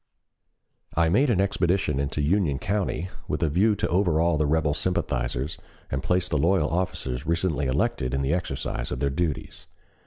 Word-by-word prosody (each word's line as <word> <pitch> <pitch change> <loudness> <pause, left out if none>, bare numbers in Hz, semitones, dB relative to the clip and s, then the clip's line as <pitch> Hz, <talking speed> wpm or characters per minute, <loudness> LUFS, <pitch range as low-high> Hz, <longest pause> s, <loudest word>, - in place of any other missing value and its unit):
I 85 0 +3
made 130 - +3
an 105 -6 +2
expedition 90 -6 +1
into 70 +1 -1
Union 80 -3 +2
County 95 0 -2 0.2
with - - -1
a 80 - +2
view 100 +8 +3
to - - -1
overawe 85 -3 +2
the 75 -1 +1
rebel 75 -1 +2
sympathizers 65 -4 -2 0.3
and 65 - -1
place 90 +4 +1
the 75 - 0
loyal 85 -1 +2
officers 80 -7 -2
recently 85 -4 0
elected 65 -1 0
in 70 - 0
the 70 +4 +1
exercise 80 -7 -3
of 60 - -2
their 70 0 0
duties. 80 0 -3
80 Hz, 165 wpm, -26 LUFS, 70-90 Hz, 0.3 s, I